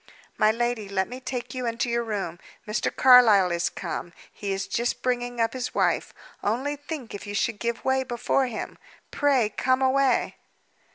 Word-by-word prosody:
"My 215 0 +4
lady, 235 -2 -2
let 190 -1 0
me 250 +1 -8
take 250 -2 -5
you 255 -2 -3
into 230 +2 -1
your 235 0 0
room. 195 -6 -4 0.3
Mr. 210 - 0
Carlyle 225 -8 +6
is 170 0 0
come; 175 - -5 0.2
he 200 -1 -4
is 195 0 -2
just 235 +4 -2
bringing 245 -1 -1
up 225 0 +1
his 255 -1 -4
wife. - - +1 0.3
Only 260 +8 -1
think 290 -4 -7
if 205 - -7
you 205 - -5
should 220 0 0
give 235 0 -3
way 265 0 +2
before 255 +1 0
him! 230 -3 -6 0.3
Pray 275 -6 +2
come 255 +4 +1
away!" 265 -1 +2
240 Hz, 175 wpm, -25 LUFS, 210-255 Hz, 0.3 s, Carlyle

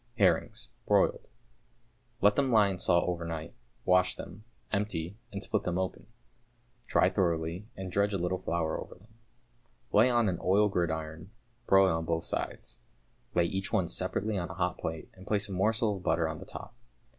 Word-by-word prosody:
=Herrings, - - +2 0.2
Broiled.= - - +3 0.9
Let 105 0 +5
them 135 0 +2
lie 105 -3 +5
in 95 -2 -4
salt 85 -2 +3
overnight, 85 -2 -3 0.3
wash 90 0 +4
them, 105 +4 -10 0.3
empty, 100 -4 -2 0.2
and 100 -1 -4
split 110 - +1
them 90 0 -2
open. 95 -1 -3 0.8
Dry - - +3
thoroughly, 85 +1 -1
and 95 -1 -5
dredge 100 +2 +2
a 100 - 0
little 90 +1 -1
flour 85 -3 -1
over - - -10
them. 105 +5 -21 0.8
Lay 110 +5 +6
on 120 -3 +3
an 90 -3 -1
oiled 100 +2 +3
gridiron, 80 -1 -2 0.4
broil 95 -3 +5
on 80 0 -2
both 80 0 -1
sides. - - -4 0.6
Lay 85 - +4
each 95 +3 -2
one - - +2
separately 100 - -1
on 85 - -4
a - - -7
hot - - -1
plate, 80 -1 -4
and 95 +1 -14
place 105 -1 +1
a - - -9
morsel 105 +2 +1
of - - -10
butter 80 -1 +2
on 80 -1 -5
the - - -9
top. - - -8
95 Hz, 175 wpm, -30 LUFS, 85-105 Hz, 0.9 s, Lay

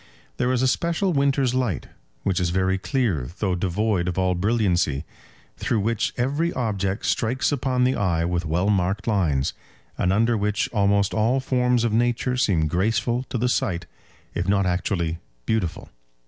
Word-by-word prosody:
There 125 +1 +1
is 130 0 +1
a - - +4
special 170 +7 +1
winter's 140 -3 +2
light, 125 - -1 0.4
which 95 -3 +1
is 90 -1 +1
very 95 +1 +1
clear 100 - -1
though 95 -3 0
devoid 95 +1 0
of 90 - -2
all 95 -1 +2
brilliancy, 90 - +1 0.5
through 110 - 0
which 115 +1 0
every 145 +7 0
object 100 -4 -2
strikes 125 +5 +1
upon 130 -2 0
the 130 +1 +3
eye 85 -4 +1
with 90 0 -1
well 90 +6 +1
marked 95 +1 0
lines, 85 - +1 0.5
and 90 - +2
under 115 +4 +3
which 105 -1 0
almost 100 -1 +2
all 115 +5 +2
forms 125 -2 +1
of 115 -2 0
nature 120 +2 +1
seem 100 -11 +2
graceful 115 - 0
to - - -2
the 120 +2 +1
sight 90 -8 0 0.5
if 85 +2 -2
not 100 -1 +3
actually 90 -2 -1 0.3
beautiful. 95 -4 -2
105 Hz, 160 wpm, -24 LUFS, 90-125 Hz, 0.5 s, a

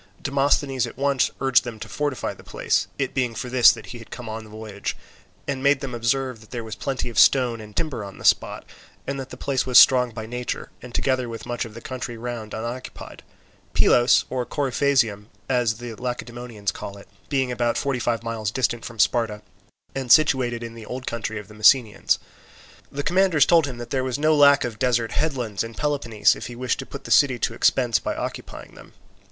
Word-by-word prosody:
Demosthenes 140 -2 +1
at 120 - -11
once 140 -1 +2
urged 135 -1 +4
them 120 -3 -7
to 110 - -7
fortify 145 +4 -2
the - - -16
place, - - 0
it 135 -2 -2
being 125 -4 -1
for 125 - -5
this 125 -1 +7
that - - -8
he 120 - -9
had 115 - -13
come 120 -2 -8
on 110 0 -5
the 110 - -14
voyage, 105 -1 -6 0.5
and 135 -2 -2
made 140 0 +3
them 130 -1 -6
observe 120 -1 -2
there 120 -2 -5
was 110 -1 -7
plenty 135 +1 -3
of 120 - -1
stone 120 -4 +4
and 105 -1 -12
timber 145 -9 -2
on 100 -1 -9
the - - -10
spot, - - +2 0.4
and 140 0 -3
that 135 -1 -6
the - - -10
place 135 -2 -1
was 125 - +5
strong 125 -1 +7
by 110 -1 -7
nature, 125 +2 -5
and 125 -1 -10
together 130 -2 0
with 115 -1 -7
much 120 0 -3
of 110 -1 -11
the 115 - -9
country 125 -2 -6
round 115 -2 -6
unoccupied; 120 +3 -7 0.5
Pylos, 120 +1 +5
or 130 -1 -2
Coryphasium, 130 -6 0 0.2
as 125 -4 +1
the 120 0 -7
Lacedaemonians 120 -2 -4
call 100 - -8
it, 100 - -14 0.2
being 135 -3 0
about 120 -1 0
forty 135 -2 -1
five 115 -1 -1
miles 115 -2 -3
distant 120 0 -1
from 115 - -8
Sparta, 110 -2 +1 0.5
and 130 -3 -3
situated 130 -6 +4
in 115 0 -7
the 115 -2 -11
old 130 +1 -6
country 110 -1 -3
of 105 -2 -8
the 105 - -14
Messenians. 110 +1 +4 0.7
The 145 +1 -4
commanders 180 -3 +3
told 165 -4 +4
him 130 -3 -6
that 120 0 -8
there 130 -1 0
was 130 0 -2
no 155 +1 +3
lack 145 -1 +6
of 115 -4 -5
desert 120 -3 +1
headlands 125 -10 -1
in 115 0 -8
Peloponnese 120 -9 +1
if - - -7
he 120 - -8
wished 125 0 -1
to - - -6
put - - -9
the - - -8
city 135 -4 +5
to 115 - -1
expense 120 0 +2
by - - -3
occupying - - -7
them. - - -15
120 Hz, 210 wpm, -23 LUFS, 115-135 Hz, 0.7 s, this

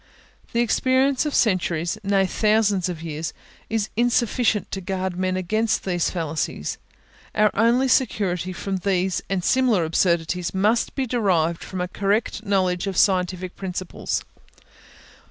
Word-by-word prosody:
The 235 - +1
experience 260 +4 +2
of 295 - -2
centuries, 175 -5 +1
nay, 195 -1 +2
of 190 - -3
thousands 210 -4 +2
of 165 -2 -6
years, 160 0 -4 0.4
is 220 -1 -1
insufficient 235 -1 +1
to 195 - -3
guard 190 0 -3
men 185 0 -1
against 215 +5 0
these 175 -3 0
fallacies; 160 -3 -3 0.6
our 215 0 +4
only 235 +5 +3
security 190 -8 +1
from 190 +1 -3
these 185 0 0
and 190 -2 -1
similar 245 -9 +3
absurdities 170 +2 0
must 215 +5 +1
be 270 - 0
derived 185 -9 +1
from 185 -1 -5
a 180 - -1
correct 205 +4 -1
knowledge 190 -3 0
of 190 -2 -3
scientific 185 -1 +1
principles. 185 -1 -4
190 Hz, 135 wpm, -23 LUFS, 180-220 Hz, 0.6 s, our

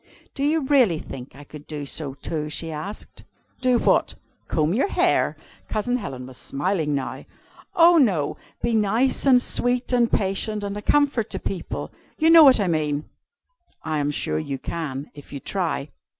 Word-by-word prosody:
"Do 275 - -3
you 305 +1 +2
really 255 - +4
think 130 -4 -9
I 145 - -11
could 150 0 -12
do 150 -2 -5
so 140 -1 -3
too?" 150 +1 -4
she 165 +2 -4
asked. 175 +8 -8 0.4
"Do 255 -1 +3
what? - - +2 0.3
Comb 155 +1 +1
your 260 - +2
hair?" - - +1 0.3
Cousin 245 +4 -1
Helen 135 - -6
was 130 -1 -12
smiling 155 0 -1
now. 135 -2 -4 0.5
"Oh 340 -1 +7
no! 185 - +2 0.3
Be 235 - +1
nice 225 +6 +1
and 255 -2 +7
sweet 245 0 0
and 240 -2 +3
patient, 205 +2 -1
and 200 0 -4
a 210 - -5
comfort 275 -2 +2
to - - -4
people. 185 -3 -5 0.3
You 320 +1 +4
know 330 -1 +10
what 265 -5 +7
I 200 - +1
mean." 150 -3 -1 0.7
"I 155 -1 -1
am 145 0 0
sure 80 - -1
you 135 - -4
can, 140 -1 -5
if 145 -2 -13
you 140 - -5
try." 165 -4 -2
190 Hz, 175 wpm, -23 LUFS, 145-245 Hz, 0.7 s, know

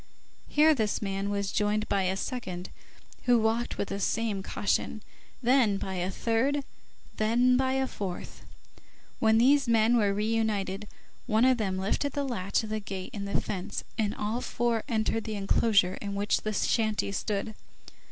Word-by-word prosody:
Here 310 +1 +5
this 220 -7 0
man 195 0 -2
was 200 -1 -1
joined 210 +1 0
by 195 -2 +1
a 190 +1 0
second, 190 -6 -5 0.5
who 245 -1 +5
walked 225 +2 0
with - - -2
the 200 - -3
same 215 -1 0
caution, 205 +2 -1 0.4
then 240 -5 +4
by 190 -1 -4
a 180 0 -1
third, 245 +8 0 0.5
then 240 +4 +3
by 260 0 +2
a 265 0 +1
fourth. 190 -8 -6 0.8
When 220 0 +4
these 270 +3 +4
men 230 0 +4
were 210 -4 +3
re 205 +2 -1
united, 210 -3 -1 0.4
one 220 +1 +3
of 255 -2 +4
them 190 -3 -1
lifted 210 +9 -1
the 285 -1 -1
latch 200 -4 -1
of 215 - -6
the 215 - -1
gate 195 -2 -6
in 200 -2 -4
the 200 - 0
fence, 185 -3 -4
and 210 -2 -1
all 215 +4 -2
four 235 -1 0
entered 225 -1 0
the 220 -1 -3
enclosure 200 -1 +2
in 200 -1 -4
which 205 +1 +1
the 215 - -2
shanty 215 -1 +1
stood. 210 +2 -2
215 Hz, 170 wpm, -28 LUFS, 200-235 Hz, 0.8 s, Here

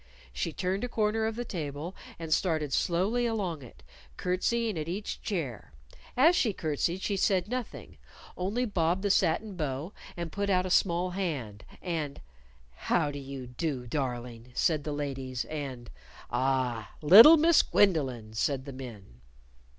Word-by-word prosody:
She - - -2
turned 190 +3 -2
a 245 - -2
corner 220 0 +1
of 220 - -3
the 240 +1 -4
table 155 -2 -5 0.2
and 165 -1 -2
started 155 -6 0
slowly 200 - +1
along 190 -9 -2
it, 125 - -14 0.3
curtseying 220 +4 0
at 155 -1 -4
each 200 +4 -4
chair. 140 - -4 0.4
As 320 +7 +6
she 225 - +2
curtsied 170 +3 -2
she 205 - 0
said 190 -1 +1
nothing, 250 0 -6 0.4
only 205 +8 -1
bobbed 180 -3 0
the 205 - +2
satin 195 +3 +1
bow 150 +2 -3 0.2
and 170 -2 -4
put 200 0 -2
out 185 -1 +2
a 185 - -3
small 180 0 +2
hand. 145 - -4 0.2
And, 160 -6 -3 0.5
"How 150 - 0
do 145 - -6
you 135 -1 -7
do, 125 +1 -3
darling!" 120 -2 -4
said 155 -4 +1
the 150 - -2
ladies, 135 -4 -3
and 135 - -6 0.4
"Ah, 130 -5 -1
little 225 - +10
Miss 330 +1 +5
Gwendolyn!" 130 - +1
said 130 +4 -1
the 140 - -7
men. 105 - -10
165 Hz, 150 wpm, -29 LUFS, 135-195 Hz, 0.5 s, little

